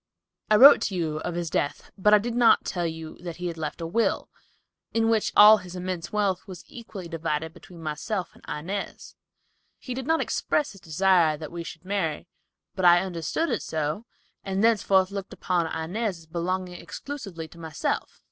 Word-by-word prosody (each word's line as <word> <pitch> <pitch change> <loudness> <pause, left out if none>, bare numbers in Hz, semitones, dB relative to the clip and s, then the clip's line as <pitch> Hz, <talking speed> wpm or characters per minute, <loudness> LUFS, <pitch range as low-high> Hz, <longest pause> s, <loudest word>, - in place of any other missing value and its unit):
I 215 - +6
wrote 270 +7 +9
to 195 - -1
you 160 -3 -1
of 170 +2 -4
his 170 -2 -3
death, 145 - -2
but 210 +1 +3
I 210 - +9
did 230 +3 -3
not 240 -1 +5
tell 175 -2 -1
you 160 -1 -7
that 175 -2 -6
he 180 - -6
had 170 -1 -3
left 155 +2 -4
a - - -3
will, 225 +8 0 0.7
in 225 0 +3
which 220 -2 +1
all 215 +1 +9
his 180 -2 -10
immense 180 -2 -4
wealth 200 -3 0
was 185 -3 -10
equally 215 -6 -9
divided 160 -1 -3
between 170 -1 -13
myself 175 +6 -3
and - - -20
Inez. 185 +7 -5 0.6
He 255 - -6
did 265 +1 -5
not 325 0 +3
express 295 -1 0
his 195 - -15
desire 165 -1 +3
that 155 0 -8
we 170 0 -5
should 165 +1 -10
marry, 190 -5 -2 0.5
but 190 - -4
I 175 0 +7
understood 185 - -2
it - - -1
so, 155 +8 -3 0.4
and 195 +1 -1
thenceforth 200 -4 +3
looked 200 -1 -6
upon 175 -2 0
Inez 180 +6 -3
as 165 - -16
belonging 180 +2 -3
exclusively 200 - -7
to 170 - -15
myself." 160 -2 -3
180 Hz, 185 wpm, -26 LUFS, 165-205 Hz, 0.7 s, wrote